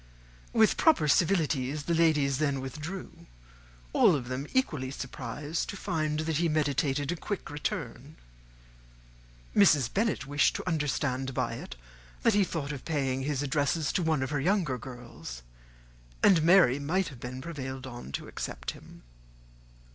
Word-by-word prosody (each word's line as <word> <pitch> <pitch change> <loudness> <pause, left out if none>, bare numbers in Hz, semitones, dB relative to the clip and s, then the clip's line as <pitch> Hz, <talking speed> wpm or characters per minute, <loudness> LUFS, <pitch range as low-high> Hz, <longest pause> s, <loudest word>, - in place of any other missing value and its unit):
With 220 -2 +4
proper 315 - +4
civilities, 150 -4 +2
the 170 - -1
ladies 150 -5 +3
then 140 -3 +1
withdrew; 155 +8 -7 0.7
all - - +5
of 125 -3 -4
them 130 +3 -3
equally 155 - 0
surprised 140 +4 -4
to 200 - -5
find 155 -5 -1
that 155 -1 -1
he 170 0 +2
meditated 145 -1 +1
a - - -1
quick 195 +1 -5
return. 145 -1 -4 1.4
Mrs. 150 - +5
Bennet 210 -5 0
wished 145 +2 +2
to - - -5
understand 135 -5 -1
by - - 0
it - - -7 0.5
that 230 - +4
he 205 0 +4
thought 155 -5 -3
of 140 -4 -6
paying 135 -4 -1
his 145 0 -1
addresses 145 +2 0
to 185 - +1
one 160 -5 +1
of 130 - -4
her 145 -2 0
younger 170 -7 +1
girls, 120 - -9 0.8
and 180 -5 +6
Mary 165 -6 +5
might 175 +7 0
have 130 -5 -12
been 125 +1 -6
prevailed 135 -3 -6
on 120 - -8
to - - -4
accept - - -5
him. - - -15
145 Hz, 150 wpm, -29 LUFS, 130-165 Hz, 1.4 s, and